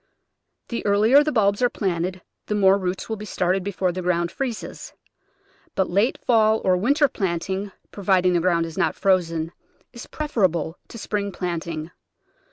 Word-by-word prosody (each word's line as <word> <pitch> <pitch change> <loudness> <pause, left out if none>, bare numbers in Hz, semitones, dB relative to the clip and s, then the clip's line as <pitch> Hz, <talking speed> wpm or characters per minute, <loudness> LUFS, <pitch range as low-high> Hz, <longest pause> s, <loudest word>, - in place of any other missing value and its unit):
The 235 - -3
earlier 215 +8 +5
the 305 - -1
bulbs 200 -4 +2
are 245 - +4
planted 185 -2 -2 0.2
the 210 - -1
more 195 -1 +4
roots 185 0 -3
will 220 - -3
be 210 - -8
started 185 -1 0
before 190 -2 -1
the 185 +1 -4
ground 175 -1 0
freezes, 260 -5 -5 0.8
but 190 -2 0
late 200 +7 +2
fall 220 -2 +4
or 185 -1 +4
winter 280 - +3
planting, 190 0 -3 0.2
providing 185 -2 +2
the 175 - +3
ground 170 -1 +2
is 165 +3 -7
not - - +1
frozen, 165 -4 +1 0.4
is 235 - -9
preferable 185 - -1
to - - -10
spring 205 -2 -3
plant 175 -2 -4
ing. 160 0 -5
190 Hz, 165 wpm, -23 LUFS, 175-215 Hz, 0.8 s, earlier